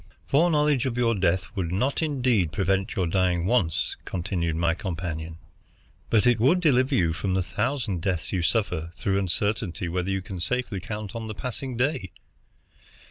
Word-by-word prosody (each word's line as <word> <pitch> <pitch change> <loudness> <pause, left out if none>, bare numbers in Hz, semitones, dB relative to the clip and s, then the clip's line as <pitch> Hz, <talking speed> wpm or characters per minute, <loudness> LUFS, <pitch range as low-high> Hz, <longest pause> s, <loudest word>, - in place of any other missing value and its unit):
"Foreknowledge 150 -3 +3
of 125 -2 -3
your 120 -1 +3
death 95 -2 +1
would 85 -4 -2
not, 130 - 0
indeed, 125 - +1
prevent 95 0 0
your 95 - +1
dying 90 0 +1
once," 95 -7 +1
continued 85 -2 -2
my 85 0 +2
companion, 80 -3 -4 0.7
"but 110 0 +3
it 120 -2 +4
would 140 +11 +4
deliver 130 -6 +3
you 85 -3 +2
from 95 +3 -1
the 95 - +1
thousand 115 - -2
deaths 90 -1 -2
you 90 - +1
suffer 85 -4 0
through 100 0 0
uncertainty 95 -1 -1
whether 90 +2 -2
you 95 -1 -1
can 95 -1 -6
safely 120 +1 -1
count 105 +1 -6
on 115 -1 -4
the 110 - -5
passing 125 +1 -4
day. 125 - 0
95 Hz, 165 wpm, -26 LUFS, 90-125 Hz, 0.7 s, it